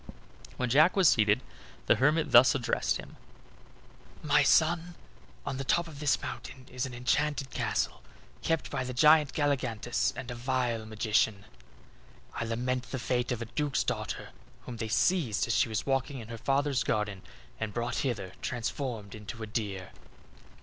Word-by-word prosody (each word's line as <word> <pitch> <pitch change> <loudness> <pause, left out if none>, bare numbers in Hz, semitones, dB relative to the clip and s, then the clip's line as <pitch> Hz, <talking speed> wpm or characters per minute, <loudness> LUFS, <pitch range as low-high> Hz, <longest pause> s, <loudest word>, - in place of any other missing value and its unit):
When 125 - 0
Jack 150 +8 +5
was 190 -4 +5
seated 110 0 +4 0.4
the - - +4
hermit 150 +4 +2
thus 120 +2 +7
addressed 125 -4 0
him: - - -11 1.1
"My 150 -1 +4
son, 170 +4 +3 0.5
on 130 - -3
the 135 - -3
top 170 +5 +1
of 150 -3 -10
this 145 -2 +2
mountain 125 +1 -7
is 125 +1 -2
an 125 - -9
enchanted 140 +2 0
castle, - - -1 0.4
kept 165 -1 -1
by 135 -2 -1
the 125 -1 -5
giant 150 +1 +6
Galligantus 120 - 0
and 125 - -6
a - - -3
vile 120 -2 -1
magician. 110 -1 +1 0.9
I - - -3
lament 125 +2 -2
the 130 - -3
fate 125 0 -1
of 120 -1 -2
a 115 - -13
duke's 145 -2 0
daughter, - - -3 0.3
whom 120 - -8
they 115 - -3
seized 135 - +2
as 115 - 0
she - - +3
was 110 - -2
walking 135 +1 0
in 115 -3 -9
her 115 - -6
father's 140 +1 +1
garden, 105 -3 -1 0.4
and 110 -1 -3
brought 120 +2 -2
hither 105 -9 -2
transformed 120 -3 -4
into 110 +2 -8
a - - -3
deer." 105 -4 -4
125 Hz, 165 wpm, -30 LUFS, 115-140 Hz, 1.1 s, thus